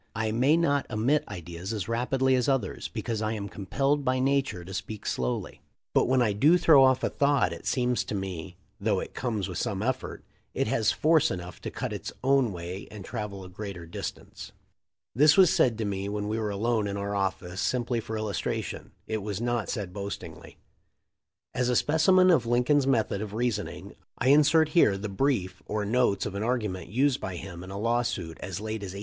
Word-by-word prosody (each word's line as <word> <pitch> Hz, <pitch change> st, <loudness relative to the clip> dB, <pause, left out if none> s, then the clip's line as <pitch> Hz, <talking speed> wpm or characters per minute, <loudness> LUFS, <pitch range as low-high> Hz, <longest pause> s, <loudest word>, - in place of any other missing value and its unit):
I 110 Hz, -1 st, -1 dB
may 130 Hz, +8 st, +3 dB
not 145 Hz, -4 st, +1 dB
emit 120 Hz, +8 st, +1 dB
ideas 90 Hz, 0 st, -7 dB
as 105 Hz, -5 st, -3 dB
rapidly 130 Hz, +3 st, +1 dB
as 125 Hz, +1 st, +2 dB
others, 135 Hz, -2 st, -1 dB
because 110 Hz, -2 st, -4 dB
I 110 Hz, 0 st, -1 dB
am 100 Hz, -2 st, -4 dB
compelled 135 Hz, +10 st, -1 dB
by 130 Hz, 0 st, +1 dB
nature 135 Hz, -9 st, 0 dB
to 95 Hz, -, -8 dB
speak 105 Hz, +2 st, -6 dB
slowly, 60 Hz, -1 st, -2 dB, 0.3 s
but -, -, +3 dB
when 130 Hz, 0 st, +3 dB
I 105 Hz, -3 st, +1 dB
do 150 Hz, -, +5 dB
throw 155 Hz, -6 st, +6 dB
off 130 Hz, -1 st, +4 dB
a -, -, +2 dB
thought 140 Hz, -11 st, +2 dB
it 85 Hz, -, -8 dB
seems 125 Hz, -1 st, +1 dB
to -, -, -4 dB
me, 90 Hz, -3 st, -5 dB, 0.2 s
though -, -, +1 dB
it -, -, -6 dB
comes 110 Hz, -6 st, -2 dB
with 90 Hz, -3 st, -4 dB
some 100 Hz, 0 st, -2 dB
effort, 130 Hz, +2 st, -3 dB, 0.3 s
it -, -, +1 dB
has 110 Hz, -, +2 dB
force 160 Hz, 0 st, +3 dB
enough 90 Hz, -1 st, -6 dB
to -, -, -4 dB
cut -, -, -4 dB
its -, -, -5 dB
own 135 Hz, -3 st, +3 dB
way 90 Hz, +2 st, -6 dB
and 105 Hz, -3 st, -9 dB
travel 105 Hz, -4 st, -5 dB
a -, -, -9 dB
greater 95 Hz, -2 st, -7 dB
distance." 85 Hz, -, -7 dB, 0.6 s
This 150 Hz, -, +5 dB
was 185 Hz, -3 st, +7 dB
said 120 Hz, -4 st, +3 dB
to 110 Hz, -, -2 dB
me 100 Hz, 0 st, -2 dB
when 105 Hz, 0 st, -3 dB
we 110 Hz, +1 st, -1 dB
were 110 Hz, -1 st, -1 dB
alone 110 Hz, +1 st, 0 dB
in 100 Hz, 0 st, -3 dB
our 100 Hz, 0 st, -3 dB
office 95 Hz, -2 st, -2 dB
simply 120 Hz, -1 st, 0 dB
for 110 Hz, 0 st, -5 dB
illustration. 110 Hz, -2 st, -3 dB
It 110 Hz, -1 st, -3 dB
was 100 Hz, -1 st, -4 dB
not 120 Hz, -2 st, -1 dB
said 100 Hz, -6 st, -4 dB
boastingly. 100 Hz, 0 st, -7 dB, 1.0 s
As 125 Hz, -1 st, 0 dB
a 125 Hz, -, +2 dB
specimen 185 Hz, +7 st, +4 dB
of 130 Hz, -9 st, +3 dB
Lincoln's 125 Hz, +4 st, +3 dB
method 110 Hz, -6 st, +1 dB
of 105 Hz, -1 st, -5 dB
reasoning 115 Hz, -3 st, -3 dB, 0.2 s
I 125 Hz, -, +1 dB
insert 150 Hz, +2 st, +5 dB
here 150 Hz, -, +4 dB
the 105 Hz, +2 st, -5 dB
brief 95 Hz, -4 st, -1 dB
or 105 Hz, -1 st, -2 dB
notes 115 Hz, -2 st, +2 dB
of 100 Hz, -, -4 dB
an 100 Hz, -, -3 dB
argument 105 Hz, -7 st, -2 dB
used 130 Hz, +5 st, +1 dB
by 95 Hz, -, -4 dB
him 90 Hz, -1 st, -8 dB
in 95 Hz, -, -9 dB
a 100 Hz, -, -6 dB
lawsuit 115 Hz, -7 st, -1 dB
as 95 Hz, -1 st, -5 dB
late 110 Hz, 0 st, -4 dB
as 95 Hz, -2 st, -6 dB
1858. -, -, -6 dB
110 Hz, 205 wpm, -27 LUFS, 100-130 Hz, 1.0 s, was